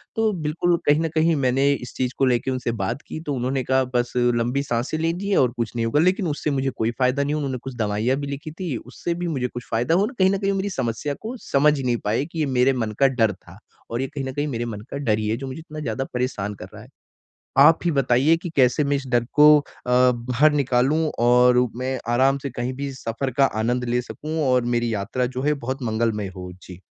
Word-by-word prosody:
तो 225 -1 +2
बिल्कुल 170 +1 0
कहीं 145 +1 +4
न 165 - -1
कहीं 160 +1 +3
मैंने 135 0 +2
इस 125 -3 -6
चीज़ 130 -1 -1
को 135 - +3
लेके 125 0 +1
उनसे 125 -2 -2
बात 115 +9 -3
की - - -6
तो 145 - -2
उन्होंने 130 +1 -1
कहा 130 +2 +2
बस 120 0 0
लंबी 120 +2 +1
साँसें 125 +3 -2
लीजिए 175 +5 -1
और 125 -3 +3
कुछ 115 0 -3
नहीं 115 -1 0
होगा, 115 +6 +1
लेकिन 185 +2 +2
उससे 150 0 -2
मुझे 135 -1 0
कोई 115 -3 -1
फ़ायदा 130 +2 +2
नहीं 145 +1 -1
हुआ। 155 - -1
उन्होंने 130 -2 -2
कुछ 135 -1 -7
दवाइयाँ 110 +4 0
भी 140 0 -4
लिखी 155 +2 -9
थी, 165 -3 -4
उससे 130 +9 -5
भी 175 0 -3
मुझे 135 -6 -1
कुछ 120 -1 -8
फ़ायदा 120 +8 +1
हो 195 +3 +3
ना, 225 - -4
और - - -14
कहीं 190 0 +5
न 195 - +1
कहीं 195 0 0
वो 195 - -1
मेरी 195 +1 -1
समस्या 130 - -2
को 230 +4 -5 0.2
समझ 145 +1 +4
नहीं 125 -2 0
पाए, 115 +7 0
कि 165 +1 -7
ये 155 - +2
मेरे 130 0 +2
मन 115 -4 -2
का 135 - +6
डर 115 -5 +1
था। 90 0 -16 0.3
और 120 +2 -1
ये 135 - -1
कहीं 140 +1 -6
न 130 - -3
कहीं 145 +2 -1
मेरे 120 -4 -3
मन 110 -3 -6
का - - -3
डर 115 -7 +1
ही 110 - -2
है, 110 - 0
जो 135 +2 -6
मुझे 130 +3 -6
इतना 155 -1 -9
ज़्यादा 130 -3 -2
परेशान 125 -5 -2
कर - - -9
रहा - - -10
है। - - -15 0.7
आप 155 +4 +7
ही 175 - +2
बताइए, 135 +3 +3
कि 170 +1 -7
कैसे 130 +2 +3
मैं 140 0 +1
इस 140 -1 -5
डर 120 -2 +2
को 150 +1 +7
अ, - - -14 0.2
बाहर 125 +3 +3
निकालूँ 140 +3 +2
और 125 +1 +5 0.2
मैं 130 +1 -2
आराम 135 +3 +3
से 140 - -4
कहीं 120 +1 -3
भी 140 +1 -4
सफ़र 130 +1 -4
का 140 - +6 0.2
आनंद 120 +2 0
ले 120 0 0
सकूँ 155 +5 -5
और 125 -1 +3
मेरी 120 -1 0
यात्रा 110 +5 -1
जो 130 - -1
है, 150 +2 +2
बहुत 130 +1 -3
मंगलमय 110 -3 -1
हो? 90 -1 -7
जी। 90 -1 -11
130 Hz, 250 wpm, -23 LUFS, 120-150 Hz, 0.7 s, आप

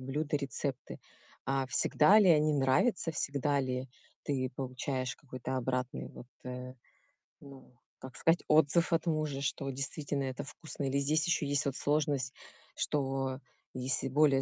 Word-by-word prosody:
блюда, 145 +3 -2
рецепты, 140 -1 -4 0.5
а 135 0 0
всегда 150 +9 +5
ли 200 -4 +5
они 155 -1 +4
нравятся, 145 - +2
всегда 140 -1 0
ли 130 0 -3 0.4
ты 130 -3 -1
получаешь 130 0 -3
какой-то 130 -2 -5
обратный 130 0 -2
вот, 120 - -12 0.2
э, 125 0 -6 0.7
ну, 135 -2 -14 0.3
как 130 -1 -9
сказать, 165 +1 +2
отзыв 155 +3 +4
от 165 +1 +1
мужа, 155 -4 -1
что 135 0 -2
действительно 140 +1 -2
это 130 -1 -4
вкусно? 150 +1 -7
Или 135 0 +1
здесь 155 +3 +2
ещё 175 -4 +1
есть 145 +1 +1
вот 135 - -1
сложность, 145 -4 0 0.4
что 135 -2 -1 0.3
если 130 +1 0
более 140 -1 +4
135 Hz, 140 wpm, -32 LUFS, 130-150 Hz, 0.7 s, всегда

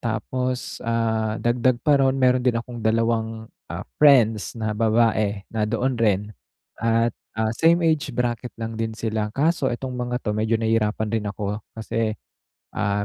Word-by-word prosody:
Tapos, 125 +3 -3
ah, 110 -1 0
dagdag 120 +1 +2
pa 145 -2 +4
ron 135 0 +3
meron 130 -1 +3
din 125 -2 +3
akong 120 0 -5
2 110 0 0 0.5
friends 120 -8 +5
na 110 -1 -1
babae 110 -2 +2
na 110 -1 0
doon 125 +4 0
rin 105 -4 +3 0.6
at, 115 +1 +2 0.3
ah, 110 0 +1
same 170 +6 +4
age 155 -3 +1
bracket 120 0 -2
lang 115 0 -4
din 110 -1 -2
sila 110 -1 -2
kaso 155 0 +1
itong 130 +1 -4
mga 125 0 -2
'to 105 - -1
medyo 110 +1 +1
nahirapan 110 -1 0
rin 110 -2 -1
ako 105 0 -3 0.2
kasi, 110 0 -2 0.6
ah, 100 -1 0
115 Hz, 150 wpm, -23 LUFS, 110-125 Hz, 0.6 s, friends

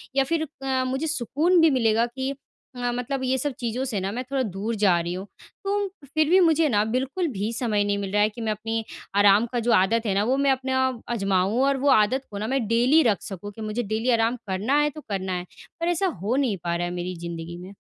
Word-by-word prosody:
या 275 - +4
फिर 315 +3 -1 0.2
अ, 260 -1 0
मुझे 265 +5 -2
सुकून 310 +5 +2
भी 325 - +6
मिलेगा 230 -4 +2
कि 265 +3 -4 0.4
अ, 245 0 -1
मतलब 250 +2 -3
ये 260 +1 +1
सब 285 +2 -2
चीज़ों 240 +1 -2
से 230 -6 -2
ना 190 +1 -2
मैं 245 +4 -3
थोड़ा 270 - +1
दूर 210 +2 -3
जा 180 -4 +5
रही 170 +1 -3
हूँ। 190 +2 -6 0.4
तो 400 0 0 0.3
फिर 310 -1 +2
भी 370 +2 +6
मुझे 325 -3 +4
न 205 0 +4
बिल्कुल 270 +8 -1
भी 205 +1 -2
समय 220 -3 0
नहीं 205 0 0
मिल 200 -1 -4
रहा 210 - +3
है 210 - +4
कि 220 +2 -10
मैं 220 -1 -1
अपनी 225 +1 -3 0.3
आराम 205 +2 +5
का 240 - +1
जो 235 +1 0
आदत 225 +5 +3
है 205 - +1
ना 200 - +2
वो 255 +5 +1
मैं 275 -1 +3
अपना 260 0 0 0.3
आजमाऊँ 195 +1 +1
और 275 0 +2
वो 280 +2 +1
आदत 255 +2 +3
को 200 - -6
ना 215 - -3
मैं 265 -1 0
डेली 245 +8 +4
रख 220 -6 +2
सकूँ 200 +1 -7
कि 220 - -11
मुझे 215 +3 -2
डेली 220 +3 -1
आराम 225 +2 +1
करना 210 +10 +1
है 295 - +2
तो 305 +1 -10
करना 190 -2 -2
है 180 0 -3 0.3
पर 335 - -1
ऐसा 350 +2 +1
हो 215 +6 0
नहीं 260 -8 +1
पा 170 0 -1
रहा 175 0 -1
है 175 - -5
मेरी 180 +1 -4
ज़िंदगी 170 0 -6
में। 185 +3 -10
230 Hz, 250 wpm, -25 LUFS, 200-270 Hz, 0.4 s, भी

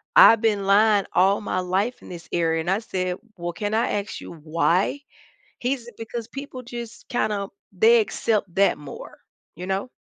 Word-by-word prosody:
"I've 225 - +9
been 210 -3 +1
lying 205 0 +4
all 195 +3 +4
my 185 -3 -2
life 190 +7 -1
in - - -13
this 175 -1 -9
area." 165 -1 +1
And 175 +3 -1
I 200 - +2
said, 185 -4 -3 0.2
"Well, 175 0 -3
can 205 +4 -3
I 225 - +2
ask 205 - -8
you - - -9
why?" 165 - +1 0.6
He's 245 -1 -2
because 225 0 -6
people 275 -2 -7
just 235 -1 -8
kinda 210 -4 -1 0.2
they 225 +5 +5
accept 205 -3 -1
that 200 0 +4
more, 145 -2 -10 0.4
you 180 +3 -7
know? 195 +5 -2
200 Hz, 175 wpm, -24 LUFS, 180-230 Hz, 0.6 s, I've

